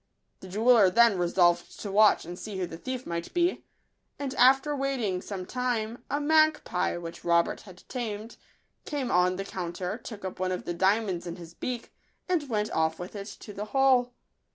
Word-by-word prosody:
The 190 - -10
jeweller 215 +1 +5
then 230 -1 +5
resolved 175 0 +2
to 205 - -4
watch 210 -2 +5
and 175 +2 -8
see 210 -3 -6
who 185 - -1
the 165 -1 -9
thief 255 +2 -5
might 170 0 -4
be; 350 +1 +1 0.5
and 275 -2 -4
after 270 +4 +4
waiting 255 -10 -1
some 190 -2 -6
time, 240 -1 -2
a 285 - 0
magpie, 310 - +2
which 170 -1 -8
Robert 170 0 +2
had 185 -3 -14
tamed, 225 -3 -5 0.5
came 280 -5 -3
on 180 +1 +3
the 195 +1 -4
coun 175 -3 -5
ter, 185 +5 -4
took 215 -4 -9
up 185 - -6
one 185 0 0
of 180 - -4
the 175 - -2
diamonds 190 -1 +1
in 170 - -5
his 170 -2 -11
beak, 245 +5 -5 0.3
and 320 -6 0
went 210 -2 -1
off 160 0 +1
with 180 +4 -8
it 200 0 -6
to 210 - -9
the 205 +1 -5
hole. 255 +1 +3
205 Hz, 190 wpm, -28 LUFS, 180-250 Hz, 0.5 s, jeweller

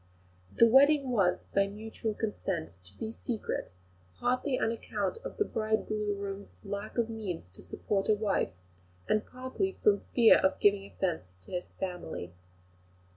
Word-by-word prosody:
The - - +8
wedding 275 +2 +6
was, 185 -6 +2
by 200 0 +4
mutual 215 +1 -4
consent, 195 -6 -2 0.2
to 95 +2 -12
be 220 - -4
secret, 230 - -4 0.4
partly 255 +2 +1
on 225 - +2
account 230 - -2
of - - -6
the 415 - +2
bridegroom's 210 - -2
lack 200 +2 -5
of 235 -2 +2
means 195 - -5
to 95 - -8
support 195 0 -2
a 215 - +6
wife, 205 -2 +1 0.6
and 215 0 +2
partly 260 +10 -3
from 205 -1 +5 0.2
fear 235 -3 +8
of 190 - +2
giving 200 -1 +4
offence 160 - -2
to 90 - -13
his 180 -1 -4
family. 175 - -5
210 Hz, 145 wpm, -31 LUFS, 195-230 Hz, 0.6 s, The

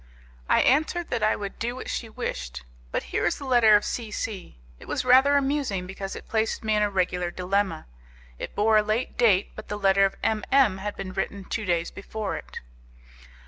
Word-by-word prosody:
I - - +5
answered 315 +5 +1
that 240 - 0
I 215 - +3
would 200 -1 -6
do 240 +2 -2
what 260 - -7
she 230 - -4
wished. 65 - -5 0.3
But - - -1
here - - +1
is - - -1
the 280 - -8
letter 240 -5 +6
of 205 - +3
C 230 -3 -3
C. 210 - -5 0.2
It - - -13
was - - -2
rather 265 +3 +6
amusing, 270 -9 -1
because 195 +1 -6
it - - -10
placed 220 0 -1
me 220 0 +1
in 210 - +2
a 210 - +2
regular 180 -2 0
dilemma; 185 -1 -1 0.5
it - - -6
bore 215 +1 +4
a - - +6
late 215 +4 -2
date, 205 -6 +3
but 215 - -9
the 210 - -4
letter 195 -1 +4
of 195 - +2
M 220 -1 +1
M 255 -8 +4
had 205 +1 -4
been 190 -1 -6
written 200 +1 -3
two 215 +3 -4
days 170 -2 0
before 210 0 -5
it. - - -8
210 Hz, 210 wpm, -26 LUFS, 195-235 Hz, 0.5 s, letter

